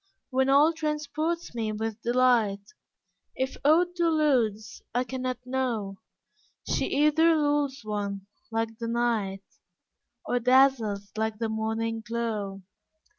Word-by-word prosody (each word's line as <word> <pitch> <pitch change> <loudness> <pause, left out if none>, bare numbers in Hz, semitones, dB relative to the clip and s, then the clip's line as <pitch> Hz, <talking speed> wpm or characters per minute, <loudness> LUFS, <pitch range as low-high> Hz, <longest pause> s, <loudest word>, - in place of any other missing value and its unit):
When 265 +1 +2
all 290 +4 +5
transports 310 +1 -2
me 225 -2 -2
with 220 0 -4
delight, 235 -5 +2 0.7
If 260 0 -2
aught 340 +5 +4
deludes 280 - +1
I 245 - +2
can 260 0 -6
not 255 0 -2
know, 235 -7 -2 0.7
She - - 0
either 305 +3 +4
lulls 290 -2 0
one 200 -2 -4 0.2
like 225 -1 -2
the 230 - -3
Night, 225 -5 -1 0.8
Or 245 - 0
dazzles 240 -6 +3
like 220 0 -1
the 225 0 -2
Morning 225 +1 -2
glow. 210 -4 -3
235 Hz, 120 wpm, -27 LUFS, 220-275 Hz, 0.8 s, all